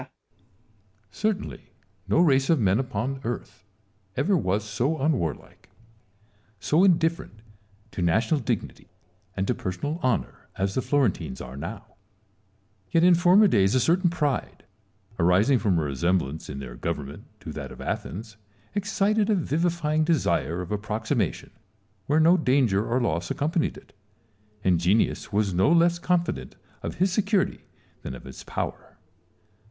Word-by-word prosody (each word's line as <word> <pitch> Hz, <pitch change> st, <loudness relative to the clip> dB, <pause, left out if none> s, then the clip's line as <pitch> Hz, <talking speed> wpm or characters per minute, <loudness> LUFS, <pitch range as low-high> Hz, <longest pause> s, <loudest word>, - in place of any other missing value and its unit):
Salomon. -, -, -15 dB, 1.0 s
Certainly 210 Hz, -, -2 dB, 0.4 s
no 100 Hz, -, +2 dB
race 135 Hz, -5 st, +3 dB
of 165 Hz, -4 st, +4 dB
men 100 Hz, -1 st, +3 dB
upon 130 Hz, +1 st, -3 dB
earth 105 Hz, -4 st, -6 dB, 0.5 s
ever 175 Hz, +10 st, +2 dB
was 100 Hz, -, 0 dB
so 120 Hz, +9 st, -1 dB
unwarlike, 130 Hz, -, -2 dB, 0.9 s
so 155 Hz, -, +2 dB
indifferent 165 Hz, -, +1 dB, 0.5 s
to -, -, -5 dB
national 110 Hz, -, +2 dB
dignity 120 Hz, -5 st, -4 dB, 0.5 s
and 95 Hz, -, 0 dB
to -, -, +1 dB
per 95 Hz, -, -4 dB
sonal 145 Hz, -, -4 dB
honour, 125 Hz, -4 st, -1 dB
as 95 Hz, 0 st, -1 dB
the 130 Hz, -, 0 dB
Florentines 125 Hz, -, 0 dB
are 65 Hz, +1 st, -8 dB
now: 70 Hz, -, -6 dB, 1.0 s
yet 165 Hz, -, +3 dB
in 180 Hz, 0 st, +7 dB
former 180 Hz, +5 st, +6 dB
days 100 Hz, -, +3 dB
a -, -, +4 dB
certain 175 Hz, +7 st, +3 dB
pride, 150 Hz, -5 st, -2 dB, 0.6 s
arising 95 Hz, +10 st, +4 dB
from 100 Hz, -6 st, +1 dB
a 80 Hz, -, +1 dB
resemblance 80 Hz, +1 st, -1 dB
in 70 Hz, -, -5 dB
their 65 Hz, -3 st, -7 dB
government 75 Hz, 0 st, -5 dB
to -, -, -8 dB
that -, -, -7 dB
of -, -, -11 dB
Athens, 110 Hz, +3 st, -5 dB, 0.4 s
excited 205 Hz, +1 st, +1 dB
a 215 Hz, -, +4 dB
vivifying 160 Hz, -1 st, 0 dB
desire 90 Hz, -, 0 dB
of 90 Hz, -, -9 dB
approximation 105 Hz, -, -2 dB, 0.6 s
where 150 Hz, +2 st, +3 dB
no 170 Hz, +3 st, +5 dB
danger 125 Hz, -, +2 dB
or 120 Hz, +2 st, +2 dB
loss 85 Hz, -8 st, -1 dB
accompanied 160 Hz, +3 st, -1 dB
it; -, -, -17 dB, 0.7 s
and 90 Hz, -3 st, +3 dB
Genius 95 Hz, +7 st, +1 dB
was 100 Hz, -2 st, +1 dB
no 95 Hz, -, +3 dB
less 170 Hz, 0 st, +4 dB
confident 170 Hz, -, -1 dB, 0.3 s
of -, -, -5 dB
his 185 Hz, +1 st, +1 dB
security 205 Hz, -1 st, 0 dB, 0.4 s
than 65 Hz, -, -6 dB
of -, -, -11 dB
his 65 Hz, -, -10 dB
power. -, -, -5 dB
125 Hz, 145 wpm, -25 LUFS, -, 1.0 s, in